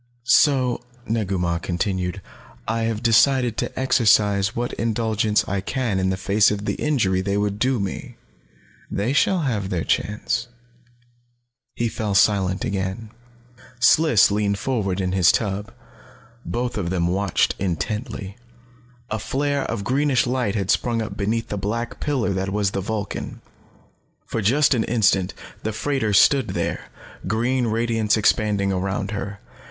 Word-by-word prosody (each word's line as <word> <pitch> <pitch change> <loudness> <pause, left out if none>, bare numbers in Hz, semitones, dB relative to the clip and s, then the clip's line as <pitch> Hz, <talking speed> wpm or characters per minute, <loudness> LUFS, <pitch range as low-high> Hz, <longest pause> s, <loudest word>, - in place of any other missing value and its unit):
"So," 130 -2 +3 0.2
Negu 105 -4 -1
Mah 85 -1 0
continued, 90 +1 -2 0.4
"I 115 +1 0
have 115 0 -2
decided 120 +1 +4
to - - -3
exercise 105 -5 +3
what 120 +1 -2
indulgence 110 -2 0
I 100 -1 -1
can 115 -2 -1
in 95 0 +1
the 95 - -1
face 100 +2 +3
of 105 0 -3
the - - 0
injury 105 -11 0
they 100 +1 -1
would 105 0 -1
do 130 +1 +1
me. 100 -1 -5 0.7
They 110 +7 -1
shall 180 +5 +2
have 105 -9 -1
their 90 -5 -1
chance." 105 +3 -1 1.3
He 120 - 0
fell 110 -3 -3
silent 95 -2 +2
again. 95 +3 -3 0.7
Sliss 120 -4 +5
leaned 100 -1 0
forward 100 -7 -1
in 90 -1 -1
his 95 -3 +5
tub. 105 0 -2 0.7
Both 120 -2 -3
of 85 -4 -2
them 90 -2 0
watched 95 +1 +1
intently. 100 - -3 0.7
A 110 - -1
flare 140 +5 -1
of 110 -3 -3
greenish 135 +2 +2
light 125 -4 -1
had 100 -1 0
sprung 120 -2 0
up 110 - -6
beneath 110 +3 -2
the 105 - -3
black 115 +4 -3
pillar 130 -9 0
that 95 +1 -2
was 100 -1 0
the 100 - -2
Vulcan. 105 0 -4 0.9
For 115 - -3
just 135 +9 +3
an 115 -3 +1
instant 100 -5 +1 0.3
the 110 - -2
freighter 120 0 -1
stood 130 +5 +5
there, - - -2 0.4
green 120 +4 0
radiance 115 -1 +1
expanding 105 -2 +2
around 95 +2 -2
her. 100 -1 -5
105 Hz, 145 wpm, -22 LUFS, 100-120 Hz, 1.3 s, Sliss